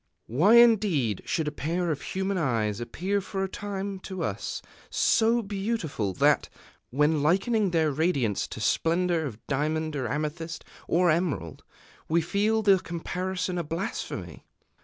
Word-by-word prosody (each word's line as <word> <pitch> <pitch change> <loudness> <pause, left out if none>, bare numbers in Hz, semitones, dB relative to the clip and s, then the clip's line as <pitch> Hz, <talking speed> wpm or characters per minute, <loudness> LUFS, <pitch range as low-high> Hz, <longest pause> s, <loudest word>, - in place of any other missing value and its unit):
Why 170 - +4
indeed 200 - +4
should 160 -2 0
a - - 0
pair 170 +4 -1
of 145 - -3
human 190 0 -2
eyes 110 -8 0
appear 185 +12 -2
for 195 0 -3
a - - 0
time 200 0 -5
to 185 0 -5
us - - -3 0.3
so 230 +1 +3
beautiful 195 - -2
that, - - +3 0.4
when 150 +3 +2
likening 195 - +2
their 160 -3 +2
radiance 140 - 0
to - - -8
splendor 165 +6 +1
of 115 -4 -10
diamond 155 +2 -1
or 130 -4 -2
amethyst 155 +2 -4 0.2
or 175 0 +3
emerald, 155 - -2 0.5
we 165 +2 +3
feel 205 +6 +1
the 195 -2 +5
comparison 180 +1 -3
a - - -1
blasphemy? 165 +5 -5
170 Hz, 140 wpm, -27 LUFS, 150-195 Hz, 0.5 s, the